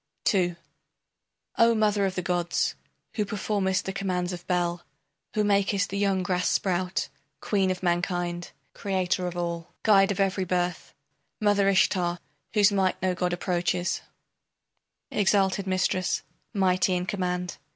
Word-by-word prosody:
II 175 -3 +1 1.0
O 230 0 +6
mother 210 -2 +2
of 190 - -4
the 180 - -2
gods, 175 -1 0 0.4
who 215 - 0
performest 195 -2 -1
the 190 - -3
commands 180 -2 -2
of 175 0 -8
Bel, 175 -1 0 0.5
Who 215 - +2
makest 200 -1 +1
the 200 - -2
young 195 -2 +1
grass 180 0 0
sprout, 185 0 0 0.3
queen 195 -3 +1
of 185 0 -3
mankind, 175 0 -1 0.2
Creator 185 -2 -1
of 175 0 -5
all, 170 -1 -4
guide 195 -3 +5
of 200 - -3
every 195 -1 +1
birth, 180 -1 -2 0.4
Mother 205 -2 +3
Ishtar, 180 -2 +2 0.4
whose 205 -1 +5
might 190 -2 +1
no 185 -1 +2
god 180 0 -1
approaches, 175 0 -1 1.1
Exalted 195 -1 +2
mistress, 185 0 0 0.3
mighty 185 -2 +2
in 180 0 -1
command! 180 -2 -2
185 Hz, 135 wpm, -27 LUFS, 180-195 Hz, 1.1 s, O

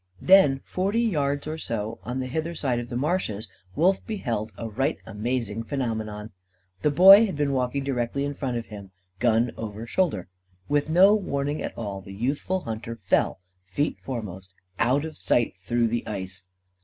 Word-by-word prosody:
Then, 165 -8 +6
forty 195 +5 -1
yards 145 -9 0
or 155 +1 -4
so 115 -4 -4
on 125 +5 -3
the 130 - -2
hither 160 +6 -3
side 130 -6 0
of 120 0 -6
the 120 - -3
marshes, 130 - -1 0.3
Wolf 185 - +3
beheld 120 - -2
a 115 - -4
right 135 +8 -1
amazing 115 0 -2
phenomenon. 110 -4 -3 0.5
The 150 - +3
Boy 195 +8 +9
had 190 - -4
been 145 -1 0
walking 130 +1 0
directly 135 +1 -1
in 145 - -2
front 130 -4 -3
of 115 - -4
him, 100 -2 -10 0.3
gun 115 0 +3
over 110 0 -6
shoulder. 115 - 0 0.4
With 145 +1 +1
no 185 +5 +7
warning 145 -8 -1
at - - -5
all, 100 -4 -4
the 95 +1 -10
youthful 140 - -1
hunter 115 -1 -5
fell, 95 - +1 0.2
feet 95 +12 -2
foremost, 95 -7 -6 0.2
out 130 +6 +2
of 160 - -8
sight, 120 -5 +1
through 115 +6 0
the 120 +1 -2
ice. 95 -2 -4
125 Hz, 170 wpm, -26 LUFS, 110-150 Hz, 0.5 s, Boy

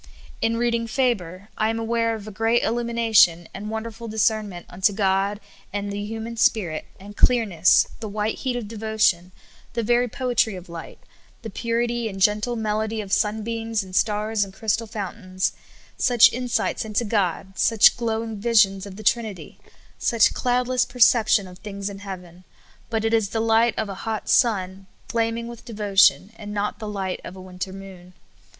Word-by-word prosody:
In 230 0 +1
reading 235 -1 0
Faber, 205 -7 -1
I 215 - +2
am 225 - -1
aware 230 0 0
of 215 -1 -9
a - - -6
great 225 +3 +1
illumina 235 -1 -1
tion 175 -5 +6
and 205 +2 -6
wonderful 225 +1 -5
discernment 215 -4 -1
unto 190 +4 +1
God 195 0 +1 0.3
and 205 0 -3
the 205 0 -4
hu 225 +1 -5
man 230 +1 -6
spirit, 180 -9 +1
and 205 +2 -11
clearness, 205 -10 +4
the 220 -2 -5
white 210 +1 -2
heat 255 -2 -2
of 240 -4 -4
devotion, 215 -5 0 0.4
the 235 -1 -1
very 240 +2 +2
poetry 240 -4 0
of 180 0 -10
light, 170 -1 -9 0.5
the 225 - -6
purit}' 235 +1 -1
and 195 -1 -7
gentle 210 +5 +2
melod}' 220 0 -1
of 195 -1 -6
sunbeams 225 +1 -1
and 185 -1 -10
stars 215 0 +1
and 195 -1 -9
crystal 220 +2 -1
fountains; 190 -3 -3 0.5
such 240 -1 +6
in 250 +2 -4
sights 225 -2 0
into 220 +2 -1
God; 195 -2 -1
such 225 -3 +5
glowing 225 -2 -3
visions 205 -3 +3
of 190 - -10
the 215 - -9
Trinity; 215 -2 -1 0.4
such 230 -2 +3
cloudless 250 0 +1
perception 225 -5 +3
of 180 0 -13
things 200 -1 -5
in 195 - -9
heaven. 180 -3 -9 0.5
But 225 -1 -1
it 225 - +1
is 220 -3 +2
the 225 - -2
light 225 +1 +3
of 220 - -1
a 200 - -5
hot 220 -1 -4
sun 195 -6 +1 0.2
flaming 230 -1 -1
with 235 -1 -10
devotion, 205 -2 +3
and 205 -1 -8
not 210 +1 -2
the 215 -2 -5
light 195 -3 -3
of 180 - -8
a 190 - -10
winter 185 0 -6
moon. 190 -2 -11
215 Hz, 175 wpm, -23 LUFS, 195-230 Hz, 0.5 s, tion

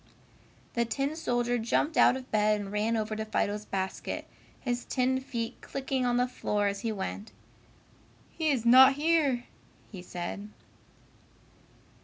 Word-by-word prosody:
The 235 - +2
tin 275 +6 -2
soldier 245 -5 0
jumped 290 +7 0
out 260 - +5
of 260 0 -11
bed 210 0 +3
and 200 -1 -6
ran 215 +2 0
over 215 0 -2
to 220 - -3
Fido's 210 -1 -1
basket, 190 -2 -3 0.3
his 245 -1 -2
tin 260 0 0
feet 235 -2 -5
clicking 265 -2 -2
on 245 0 +2
the 250 0 +2
floor 210 -4 -1
as 200 0 -1
he 225 +2 -2
went. 205 +1 -5 1.0
"He 320 -2 0
is 255 -5 0
not 260 +3 +8
here," 290 -4 +2 0.5
he 190 -4 -8
said. 180 +3 -6
235 Hz, 145 wpm, -29 LUFS, 210-260 Hz, 1.0 s, not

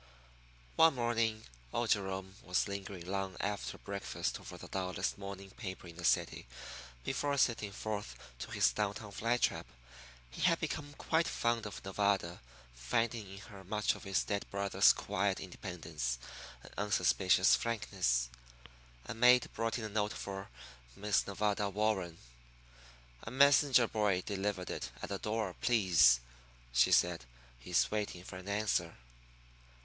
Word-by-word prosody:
One 160 -2 +6
morning 115 -2 0 0.3
old 120 -1 0
Jerome 95 -2 -1
was 90 +3 0
lingering 100 -3 -6
long 95 0 -3
after 100 0 -3
breakfast 100 -1 -4
over - - -9
the - - -10
dullest 95 0 -2
morning 100 -1 -7
paper 95 -5 -7
in 85 0 -11
the 90 - -8
city - - +1 0.6
before 140 +1 -1
setting 115 -6 +2
forth 105 - -4 0.2
to - - -6
his - - +3
down 105 +4 -1
town 105 -2 -8
fly 115 +4 0
trap. - - 0 0.6
He - - -8
had 170 -2 +4
become 150 -2 -4
quite 165 +1 +1
fond 115 -2 0
of 105 - -9
Nevada, 95 -3 0 0.3
finding 110 - -1
in 95 - -9
her 105 -4 -12
much 105 +3 +1
of - - -11
his 95 -1 +1
dead 100 -1 -3
brother's 100 0 +4
quiet 100 0 -1
independence 80 - -4 0.5
and - - -13
unsuspicious 95 -2 +4
frankness. 60 - 0 0.8
A - - -4
maid 125 +2 +5
brought 115 +1 -1
in 115 - -5
a - - -4
note 105 0 0
for 95 0 -6 0.5
Miss 105 0 +1
Nevada 105 0 0
Warren. 100 -5 0 1.0
"A - - -7
messenger 135 -1 +5
boy 105 -5 +1
delivered 100 -2 -2
it - - -4
at - - -4
the 100 -1 -3
door, 105 -3 -2
please," 85 - +5 0.5
she 60 0 +5
said. 85 -6 +3 0.4
"He's 85 +8 +1
waiting 105 -4 -2
for 90 - -8
an 95 +2 -8
answer." 100 -5 0
100 Hz, 145 wpm, -34 LUFS, 95-110 Hz, 1.0 s, One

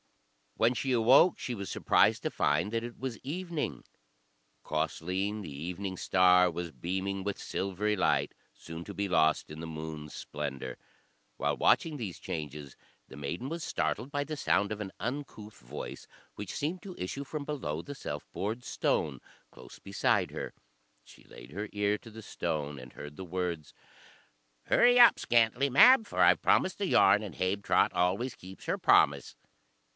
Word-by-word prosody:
When 115 +2 +3
she 130 +2 -2
awoke 125 +9 +5
she 125 - -4
was 100 -2 -6
surprised - - +3
to - - -1
find 75 +8 +1
that 115 0 -1
it 120 0 -7
was 130 -4 -4
evening. 170 +2 -4 0.8
Causleen, 90 +7 -2
the 85 - -8
evening 90 +6 -5
star, 90 0 +4
was 85 0 -5
beaming 95 +4 -3
with 100 0 -3
silvery 100 +2 -1
light, 95 - +1 0.2
soon 80 +1 -9
to 100 - -7
be 100 0 -1
lost 80 -4 +2
in 75 - -8
the 85 - -6
moon's 80 -1 -7
splendour. 70 -4 -5 0.6
While - - 0
watching 155 -2 +3
these 105 -9 -6
changes, 75 -3 -6 0.3
the - - -12
maiden 75 - -4
was 165 +2 -4
startled 125 0 -2
by 145 -1 -1
the 155 +1 -5
sound 100 -7 +1
of 105 0 -4
an 95 -2 -5
uncouth 110 -2 -6
voice, 65 +5 -8 0.3
which 105 -2 -6
seemed 165 +5 -2
to 190 -3 -8
issue 115 +10 -4
from 145 +1 -5
below 130 - -3
the 145 - -8
self 75 - -6
bored 110 +5 -3
stone, - - -1 0.3
close - - -13
beside 100 -1 0
her. - - -5 0.5
She - - -17
laid - - -13
her 105 +1 -5
ear 105 0 +1
to 115 - -13
the 110 0 -11
stone 75 -7 -3
and 65 0 -12
heard 75 0 -9
the 95 - -6
words: 85 -3 -3 0.9
"Hurry 245 0 +5
up, 240 - +8
Scantlie 120 +3 +2
Mab, 230 - +7
for - - -5
I've - - +6
promised 185 +1 +2
the 200 - 0
yarn 100 - +5
and 100 -6 -7
Habetrot 95 +2 +1
always 95 +8 0
keeps 95 +1 -12
her - - -1
promise." - - +3
100 Hz, 165 wpm, -30 LUFS, 85-125 Hz, 0.9 s, up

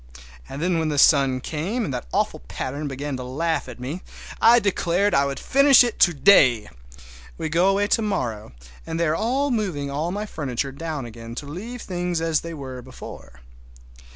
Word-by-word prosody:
And 140 +4 -5
then 175 -2 +1
when 160 -1 0
the 150 - -2
sun 135 -3 +4
came 190 - -3
and 140 - -4
that - - -5
awful - - 0
pattern 145 +3 -4
began 140 +1 -4
to 125 - -6
laugh 155 +3 -2
at 125 - -10
me 140 +9 -5 0.4
I 235 +1 +7
declared 200 -2 +1
I 140 0 +4
would 140 - -4
finish 275 -1 +6
it 240 -2 -3
to 175 - +6
day! 130 - +4 0.7
We 155 - -3
go 170 +4 +3
away 200 +1 +2
to 225 - +2
morrow, 120 - -3 0.4
and 165 0 -3
they 170 - +2
are 245 - 0
moving 180 - -2
all 150 +4 -2
my 205 +3 -3
furniture 135 - -3
down 150 -1 -5
again 115 0 -9
to 145 - -6
leave 215 +12 -7
things 175 -2 -2
as 165 -2 0
they 170 0 -7
were 130 -3 -7
before. 120 - -12
155 Hz, 185 wpm, -23 LUFS, 135-195 Hz, 0.7 s, I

